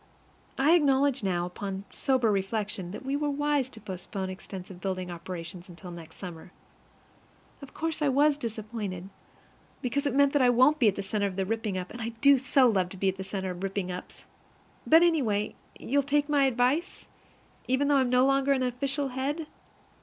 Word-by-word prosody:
I 280 +4 +4
acknowledge 280 -4 +3
now, 180 -3 0
upon 190 +2 -5
sober 255 -5 +1
reflection, 200 -1 -2
that 210 +8 -8
we 270 +1 -1
were 295 0 0
wise 290 -2 0
to 225 - -13
postpone 190 -1 -5
extensive 185 -1 -9
building 185 -2 -3
operations 175 +1 -7
until 175 +1 -10
next 165 -2 -11
summer. 175 -2 -9 1.1
Of 280 - -12
course 325 -1 -2
I 295 - +3
was 285 +2 +4
disappointed, 210 -6 -5 0.7
because 280 +3 0
it 270 - -1
meant 280 0 +4
that 290 - +3
I 250 - +5
won't 260 +5 +4
be 230 -5 +6
the 200 0 -3
center 200 +1 -1
of 190 - -6
the 190 0 -1
ripping 220 -2 -2
up, 180 0 -5
and 240 - -8
I 225 - -2
do 280 +1 +6
so 265 0 +4
love 190 -6 +1
to 190 - -10
be 190 +1 +2
the 190 0 -7
center 190 -1 -4
of 180 0 -8
ripping 195 -1 -2
ups! 180 0 -9 0.6
But, 325 +2 +7
anyway, 235 -12 +1 0.2
you'll 285 +3 +1
take 285 +1 +1
my 290 -2 +3
advice, 265 +7 0 0.6
even 260 +3 +2
though 285 -1 +4
I'm 260 -2 +2
no 250 +1 +4
longer 275 0 +3
an 260 -1 0
official 275 +3 -1
head? 280 +5 -2
235 Hz, 185 wpm, -28 LUFS, 190-275 Hz, 1.1 s, But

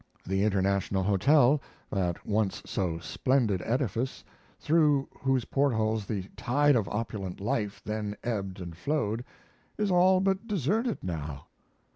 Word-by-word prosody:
The 95 +1 0
International 100 -1 +1
Hotel, 130 - +4 0.3
that 90 -4 -1
once 105 -2 0
so 90 -4 -1
splendid 105 +3 +1
edifice, 125 +1 -1 0.4
through 150 -3 +3
whose 135 -3 +1
portals 110 -6 +1
the 100 -4 -2
tide 145 +3 +3
of 110 -5 +1
opulent 105 -4 -4
life 105 0 -2
then 105 -1 -3
ebbed 100 -6 -3
and 85 -2 -7
flowed, 115 - -1 0.5
is 210 -2 0
all 185 +1 +5
but 195 +3 0
deserted 210 - 0
now. 75 -5 -5
110 Hz, 125 wpm, -29 LUFS, 95-140 Hz, 0.5 s, all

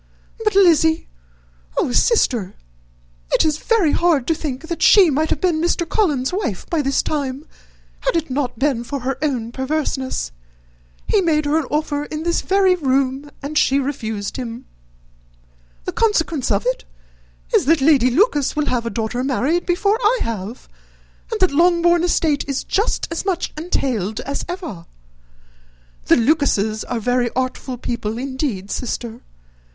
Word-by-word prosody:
But, 425 -2 +1
Lizzy! 325 -4 +4 0.7
Oh, - - +1
sister! 240 - +2 0.8
it - - +4
is 310 -1 +1
very 420 -10 +2
hard 330 -7 +2
to 330 - +2
think 300 -1 -5
that 340 -1 -4
she 380 -6 +7
might 310 +3 0
have - - 0
been 345 -4 +1
Mr. 340 0 0
Collins's 300 - 0
wife 345 - -3
by 330 -3 +2
this 275 -1 +1
time, 280 -1 -3 0.5
had 335 -10 0
not 260 -1 -2
it - - -31
been 265 -2 0
for 275 +2 -5
her 260 +1 -3
own 250 -7 -1
perverseness. 265 0 -2 0.7
He 415 - +2
made 310 -4 +1
her 290 +1 +1
an 295 - -4
offer 295 -1 -1
in 310 +1 -5
this 340 0 0
very 385 -1 +3
room, 275 -3 0
and 300 +2 0
she 270 - +3
refused 225 -7 -3
him. 240 -1 -6 1.2
The - - -2
consequence 330 - 0
of 200 0 0
it 255 +1 -1 0.7
is, - - +4
that 325 +3 +4
Lady 270 -3 +4
Lucas 295 - +2
will 300 -1 0
have 240 -4 -1
a - - 0
daughter 230 +2 -2
married 280 +7 0
before 400 +5 +2
I 470 +3 +3
have, 225 +1 -5 0.6
and 445 - -2
that 370 - +4
Longbourn 345 +2 +3
estate 320 -4 +1
is 275 -2 -2
just 415 +5 0
as 330 - -2
much 370 -3 -2
entailed 250 - -2
as 280 +1 -4
ever. 330 - -6 1.2
The - - +5
Lucases 230 -6 +1
are 245 - -3
very 245 +2 +1
artful 255 0 -3
people, 230 -2 -3
indeed, 260 -7 -3
sister. 235 -2 -4
285 Hz, 155 wpm, -20 LUFS, 250-335 Hz, 1.2 s, she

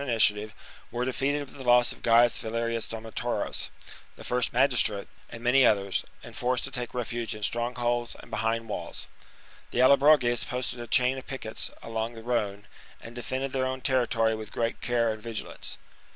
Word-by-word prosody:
Qwn 140 - -5
mitiativc, 110 -2 +3 0.4
wcrc 120 +1 -1
defeated 135 +3 0
with 140 - -15
the 135 - -7
loss 120 0 +5
of - - -9
Gaius 120 0 +5
Valerius 115 0 -2
Domnotaurus, 115 +1 -2 0.5
the - - -12
first 125 0 0
magistrate, 120 -5 +3 0.2
and 115 0 -9
many 130 +2 +5
others, 100 -4 +2 0.2
and - - -11
forced 125 0 0
to 140 - -2
take 125 -1 -5
refuge 120 -2 -2
in 105 - -8
strong 120 +3 0
holds 120 -1 -1
and - - -14
behind 115 0 -1
walls. 105 - -4 0.6
The - - -6
AUobroges 130 -2 +5
posted 125 0 -3
a 120 - -6
chain 125 +3 +3
of 130 - -14
piquets 125 -5 -4
along 115 +1 -3
the 115 - -10
Rhone, 105 -4 -1 0.3
and 115 - -10
defended 130 +3 -3
their 130 -1 0
own 130 0 -4
territory 120 -4 +2
with 110 -1 -6
great 115 0 -2
care 115 -2 +1
and 110 - -10
vigilance. 115 -1 -6
120 Hz, 180 wpm, -28 LUFS, 115-125 Hz, 0.6 s, loss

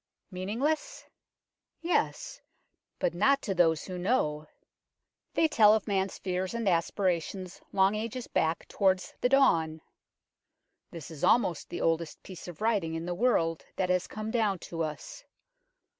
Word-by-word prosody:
Meaningless? 265 - -2 0.7
yes, 360 +8 -1 0.6
but - - 0
not 275 0 +3
to 195 - -1
those 165 -3 +3
who 180 -1 -6
know. 155 -7 0 0.9
They 325 - +4
tell 215 -7 +6
of 220 - -2
man's 195 -2 0
fears 185 +2 -3
and 230 -3 -2
aspirations 180 +1 -1
long 195 +1 +3
ages 230 +3 -4
back 160 +1 -1
towards 190 -2 +1
the 250 - +3
dawn. 165 - +3 1.1
This 165 -2 -9
is 155 - -9
almost 180 -9 +2
the - - -5
oldest 165 -1 -1
piece 185 -2 -10
of 175 +2 -9
writing 200 -8 +1
in 165 +1 -4
the 175 - -2
world 175 -6 +1
that 185 - -1
has 180 0 +1
come 215 +1 -5
down 215 -5 +1 0.2
to 165 - -2
us. 150 -4 -5
190 Hz, 145 wpm, -29 LUFS, 165-225 Hz, 1.1 s, tell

